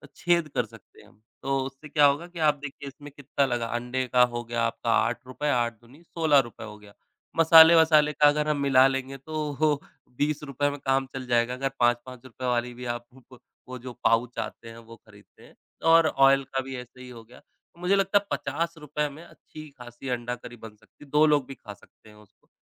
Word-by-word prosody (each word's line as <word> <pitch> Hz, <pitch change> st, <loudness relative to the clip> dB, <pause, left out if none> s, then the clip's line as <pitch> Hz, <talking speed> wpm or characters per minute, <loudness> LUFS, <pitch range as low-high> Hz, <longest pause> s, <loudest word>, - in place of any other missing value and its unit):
छेद 170 Hz, -2 st, +1 dB
कर 125 Hz, -2 st, +1 dB
सकते 110 Hz, -3 st, -18 dB
हैं -, -, -19 dB
हम। 105 Hz, -, -25 dB, 0.2 s
तो 135 Hz, 0 st, 0 dB
उससे 135 Hz, +3 st, -10 dB
क्या 150 Hz, 0 st, +4 dB
होगा 145 Hz, +5 st, +1 dB
कि 175 Hz, -1 st, -11 dB
आप 150 Hz, -, +3 dB
देखिए 140 Hz, 0 st, -8 dB
इसमें 145 Hz, +1 st, -11 dB
कितना 140 Hz, 0 st, -1 dB
लगा। 120 Hz, -2 st, -2 dB
अंडे 125 Hz, +2 st, -2 dB
का 125 Hz, 0 st, +6 dB
हो 120 Hz, 0 st, -4 dB
गया 120 Hz, 0 st, -3 dB
आपका 115 Hz, 0 st, -2 dB
₹8 130 Hz, +5 st, -1 dB
8 120 Hz, -2 st, 0 dB
दूनी 130 Hz, +7 st, -19 dB
₹16 145 Hz, -10 st, 0 dB
हो 105 Hz, 0 st, -11 dB
गया। 100 Hz, -1 st, -17 dB, 0.4 s
मसाले-वसाले 160 Hz, -2 st, +7 dB
का 150 Hz, -, +4 dB
अगर 150 Hz, +1 st, +1 dB
हम 150 Hz, -1 st, 0 dB
मिला 135 Hz, -1 st, +5 dB
लेंगे 135 Hz, 0 st, -4 dB
तो 150 Hz, 0 st, -1 dB, 0.4 s
₹20 145 Hz, -1 st, -1 dB
में 145 Hz, 0 st, -7 dB
काम 135 Hz, 0 st, 0 dB
चल 130 Hz, -1 st, -6 dB
जाएगा। 120 Hz, 0 st, +1 dB
अगर 135 Hz, +1 st, -2 dB
₹5-5 125 Hz, +1 st, -2 dB
वाली 120 Hz, 0 st, -1 dB
भी 125 Hz, +1 st, -9 dB
आप 120 Hz, -, -19 dB
भु 130 Hz, -, -18 dB
प 125 Hz, -, -15 dB, 0.3 s
वो 130 Hz, -, -6 dB
जो 125 Hz, -, -7 dB
पाउच 115 Hz, +2 st, +1 dB
आते 115 Hz, -, -7 dB
हैं 115 Hz, -, -12 dB
वो 115 Hz, 0 st, -13 dB
ख़रीदते 105 Hz, -2 st, -21 dB
हैं -, -, -18 dB, 0.3 s
और 165 Hz, 0 st, +6 dB
ऑयल 135 Hz, -1 st, +4 dB
का 135 Hz, -, 0 dB
भी 135 Hz, 0 st, -7 dB
ऐसे 125 Hz, +1 st, -11 dB
ही 125 Hz, -, -11 dB
हो 115 Hz, -2 st, -11 dB
गया। 120 Hz, +3 st, -17 dB
तो 170 Hz, -, -30 dB
मुझे 185 Hz, +2 st, +2 dB
लगता 195 Hz, +1 st, +2 dB
है 200 Hz, -, -16 dB
50 150 Hz, -3 st, -3 dB
में 155 Hz, +4 st, -12 dB
अच्छी-ख़ासी 135 Hz, -7 st, -12 dB
अंडा 120 Hz, 0 st, -3 dB
करी 120 Hz, 0 st, -12 dB
बन 110 Hz, -1 st, -12 dB
सकती 105 Hz, -, -21 dB
है। -, -, -21 dB
2 150 Hz, +1 st, +5 dB
लोग 145 Hz, -3 st, +2 dB
भी 135 Hz, -, -9 dB
खा 105 Hz, -2 st, -11 dB
सकते 105 Hz, +2 st, -22 dB
हैं 105 Hz, -, -17 dB
उसको। 105 Hz, -1 st, -23 dB
135 Hz, 210 wpm, -26 LUFS, 120-150 Hz, 0.4 s, मसाले-वसाले